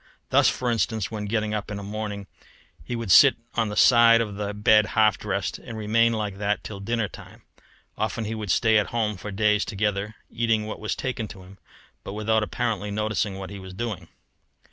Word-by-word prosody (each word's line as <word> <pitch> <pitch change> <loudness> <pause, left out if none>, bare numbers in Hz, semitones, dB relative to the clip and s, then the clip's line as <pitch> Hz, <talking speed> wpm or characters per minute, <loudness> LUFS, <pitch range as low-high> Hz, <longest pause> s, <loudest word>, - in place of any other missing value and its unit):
Thus, - - +5
for 125 -1 -1
instance, 110 -3 -1
when 105 -2 -4
getting 105 0 -1
up 105 -1 -3
in 105 - -4
a 100 - -7
morning 105 0 -5 0.6
he 120 - -4
would 115 -5 -3
sit 135 +8 +8 0.2
on 115 -2 0
the 105 - -5
side 115 -1 +6
of 110 -3 -2
the 100 0 -3
bed 105 +1 +4
half 110 -3 +5
dressed, 100 -2 -3
and 115 -3 -9
remain 115 +2 +2
like 105 -3 -3
that 105 0 -1
till 100 -2 -7
dinner 115 +2 -1
time. - - -14 0.6
Often 110 +1 -2
he 110 - -3
would 110 -3 -5
stay 110 +4 +4
at 105 - -1
home 110 -3 -1
for 100 +3 -8
days 105 +1 +2
together, 105 0 -2 0.2
eating 115 -2 0
what 110 - -6
was 105 - -2
taken 125 -4 -3
to 95 -3 -11
him, 95 +2 -15 0.4
but 100 - -7
without 110 +1 +1
apparently 105 -2 -2
noticing 105 -1 -1
what 95 0 -7
he 100 - -7
was 95 -1 -10
doing. 105 -6 -4
105 Hz, 205 wpm, -25 LUFS, 100-110 Hz, 0.6 s, sit